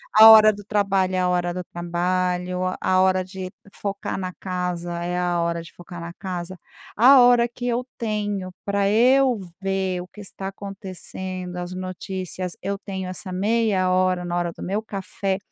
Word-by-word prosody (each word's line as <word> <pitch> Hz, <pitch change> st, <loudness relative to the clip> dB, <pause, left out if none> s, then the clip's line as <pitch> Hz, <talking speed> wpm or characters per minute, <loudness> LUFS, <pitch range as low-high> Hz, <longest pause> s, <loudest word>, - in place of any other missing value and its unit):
a 220 Hz, +1 st, +11 dB
hora 215 Hz, -1 st, +9 dB
do 205 Hz, -, -10 dB
trabalho 195 Hz, -2 st, +1 dB
é -, -, +1 dB
a 180 Hz, 0 st, +2 dB
hora 175 Hz, -1 st, 0 dB
do 180 Hz, -, -4 dB
trabalho, 180 Hz, +1 st, -1 dB, 0.2 s
a 185 Hz, 0 st, +3 dB
hora 185 Hz, 0 st, +3 dB
de 185 Hz, 0 st, -7 dB, 0.2 s
focar 200 Hz, -1 st, -4 dB
na 185 Hz, -1 st, -3 dB
casa 180 Hz, -2 st, -3 dB
é 180 Hz, +1 st, -2 dB
a 175 Hz, -1 st, 0 dB
hora 170 Hz, 0 st, -1 dB
de 165 Hz, -, -13 dB
focar 175 Hz, 0 st, -10 dB
na 170 Hz, 0 st, -7 dB
casa, 180 Hz, -1 st, -6 dB, 0.4 s
a 260 Hz, +4 st, +8 dB
hora 245 Hz, -1 st, +6 dB
que 245 Hz, +1 st, -6 dB
eu 245 Hz, +1 st, 0 dB
tenho 205 Hz, -4 st, -2 dB
pra 200 Hz, 0 st, +1 dB
eu 250 Hz, +2 st, +4 dB, 0.2 s
ver 190 Hz, -2 st, -1 dB
o 180 Hz, -, -9 dB
que 210 Hz, -, -12 dB
está 195 Hz, -1 st, -7 dB
acontecendo 190 Hz, -2 st, -7 dB
as 180 Hz, 0 st, -5 dB
notícias, 185 Hz, 0 st, -5 dB
eu 200 Hz, +1 st, -2 dB
tenho 190 Hz, -2 st, -5 dB
essa 185 Hz, 0 st, -7 dB
meia 200 Hz, -1 st, +1 dB
hora 185 Hz, -1 st, +2 dB
na 175 Hz, 0 st, -2 dB
hora 175 Hz, -1 st, -1 dB
do -, -, -11 dB
meu 200 Hz, +4 st, -1 dB
café, 195 Hz, -1 st, -3 dB
185 Hz, 180 wpm, -23 LUFS, 180-200 Hz, 0.4 s, a